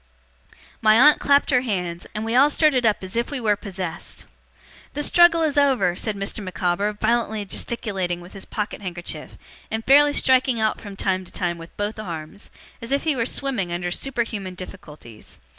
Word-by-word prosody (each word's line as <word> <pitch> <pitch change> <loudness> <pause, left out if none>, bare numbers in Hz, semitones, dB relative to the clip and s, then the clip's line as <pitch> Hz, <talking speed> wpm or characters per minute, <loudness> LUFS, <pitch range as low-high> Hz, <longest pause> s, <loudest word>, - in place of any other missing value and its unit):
My 215 +1 +5
aunt 300 +3 +7
clapped 280 0 +3
her 250 -2 +4
hands, 180 -7 -3
and 215 +1 -3
we 225 - -2
all 270 +4 +6
started 280 -6 +3
up 210 -2 0
as 185 +2 -6
if 235 +1 0
we 285 - -4
were 215 -3 +2
possessed. 185 -4 -7 0.7
'The 295 - -1
struggle 335 +1 +5
is 295 -2 +2
over!' 250 -11 +2
said 215 +2 -2
Mr. 200 +1 -3
Micawber 185 +2 -1
violently 220 -1 0
gesticulating 190 -5 -2
with 175 +1 -13
his 195 - -10
pocket 210 -1 -4
handkerchief, 175 -4 -6 0.3
and 220 0 -3
fairly 290 +2 +6
striking 260 -3 +3
out 215 0 0
from 200 -2 -9
time 190 -1 -1
to - - -14
time 170 -1 -2
with 165 0 -13
both 210 +1 -3
arms, 170 0 -7 0.3
as 230 - -8
if 280 - +1
he 310 -3 +1
were 230 -2 0
swimming 245 -13 -2
under 175 +1 -2
superhuman 220 -5 -3
difficulties. 150 - -11
210 Hz, 180 wpm, -23 LUFS, 185-255 Hz, 0.7 s, aunt